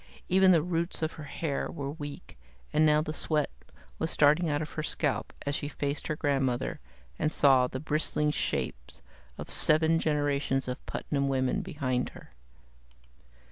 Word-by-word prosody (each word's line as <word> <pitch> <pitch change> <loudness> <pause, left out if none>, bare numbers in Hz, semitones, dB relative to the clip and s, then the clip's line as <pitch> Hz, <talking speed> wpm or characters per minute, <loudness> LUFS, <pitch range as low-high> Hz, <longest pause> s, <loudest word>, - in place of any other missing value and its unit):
Even 190 +1 +5
the 165 -4 +4
roots 170 -1 -1
of 160 - 0
her 155 - -9
hair 145 0 -3
were 140 -1 -4
weak, 145 - -8 0.4
and 155 +1 +5
now 150 0 +4
the 155 - -4
sweat 155 -1 0 0.5
was 160 - 0
starting 150 +3 +4
out 145 -1 +1
on 155 - -2
her 155 - -5
scalp 145 -7 -1
as 140 - -1
she 145 - -3
faced 145 0 -3
her 155 - -1
grandmother 135 -5 0 0.4
and 155 -1 +1
saw 135 -5 +5
the 130 - -5
bristling 150 0 0
shapes 60 - -3 0.3
of - - -6
seven 160 +1 +3
generations 145 -3 0
of 125 - -4
Putnam 140 -2 -1
women 130 -1 +1
behind 130 -4 -2
her. - - -15
145 Hz, 160 wpm, -29 LUFS, 135-155 Hz, 0.5 s, Even